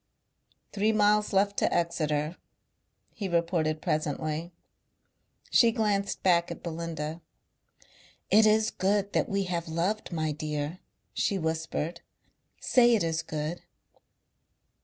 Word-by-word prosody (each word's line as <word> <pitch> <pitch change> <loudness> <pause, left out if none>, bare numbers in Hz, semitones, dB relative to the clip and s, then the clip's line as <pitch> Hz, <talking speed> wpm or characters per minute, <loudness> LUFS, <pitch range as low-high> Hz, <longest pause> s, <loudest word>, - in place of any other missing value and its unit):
"Three 210 +2 +2
miles 210 0 +3
left 200 0 +2
to - - +2
Exeter," 155 -2 0 0.8
he 200 -4 -4
reported 165 -2 0
presently. 155 +2 -2 1.0
She 235 -2 +6
glanced 205 -3 -1
back 170 -2 +3
at - - -8
Belinda. 165 -1 -4 1.1
"It 215 +1 +6
is 215 +1 +3
good 200 +1 0
that - - +1
we 195 0 0
have 175 -2 -3
loved, 185 +7 -1
my 155 -2 -1
dear," 150 +2 -4 0.3
she 200 - 0
whispered. 160 0 -3 0.6
"Say 240 -2 +4
it 210 - +1
is 160 -1 0
good." 155 +3 -4
170 Hz, 115 wpm, -28 LUFS, 160-205 Hz, 1.1 s, She